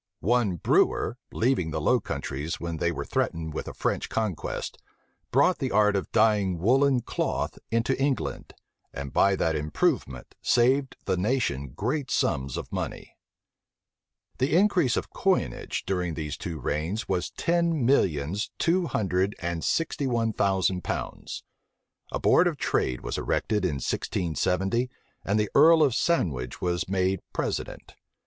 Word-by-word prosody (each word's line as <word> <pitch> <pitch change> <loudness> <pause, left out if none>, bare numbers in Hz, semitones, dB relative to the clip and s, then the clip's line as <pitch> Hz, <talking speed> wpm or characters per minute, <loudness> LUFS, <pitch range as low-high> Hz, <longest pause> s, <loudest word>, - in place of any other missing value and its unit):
One 110 -1 +2
Brewer, 85 - +2
leaving 115 -9 +1
the 80 0 -2
Low 125 +11 +3
Countries 70 -2 -4
when 85 -1 -4
they 85 +2 +1
were - - -4
threatened 80 -1 -2
with - - -4
a - - -6
French - - -1
conquest, 105 -7 -3 0.5
brought 140 +8 +3
the 130 - -1
art 105 -1 +3
of 95 - -2
dying 105 -5 +3
woollen 130 +7 +3
cloth - - -2
into 115 +3 +1
England, 135 -1 -2 0.4
and 70 -1 -6
by 100 0 +4
that 80 -3 0
improvement 75 -3 -1
saved 130 +3 +2
the 95 -2 0
nation 90 - 0
great 130 +5 -2
sums 65 -1 0
of - - -6
money. - - -5 1.2
The 140 +6 +3
increase 180 - +3
of - - -3
coinage - - -1
during 90 -4 -1
these 75 -2 -4
two 85 -6 -5
reigns 80 - -2
was 90 -2 -1
ten 170 -5 +1
millions 95 - +1
two 175 +1 +2
hundred 95 - 0
and 85 -1 -3
sixty 165 -3 0
one 115 -3 0
thousand 95 -3 +1
pounds. - - -5 0.7
A - - -1
board 180 - +4
of 165 -4 -1
trade 65 - 0
was - - -3
erected 105 -2 0
in 85 -6 0
1670; 90 - -1 0.3
and 105 +2 +1
the 105 -1 0
earl 160 +2 +7
of 140 -5 +3
Sandwich 75 - 0
was 90 -1 -1
made 95 0 +1
president. - - -4
100 Hz, 145 wpm, -27 LUFS, 85-130 Hz, 1.2 s, earl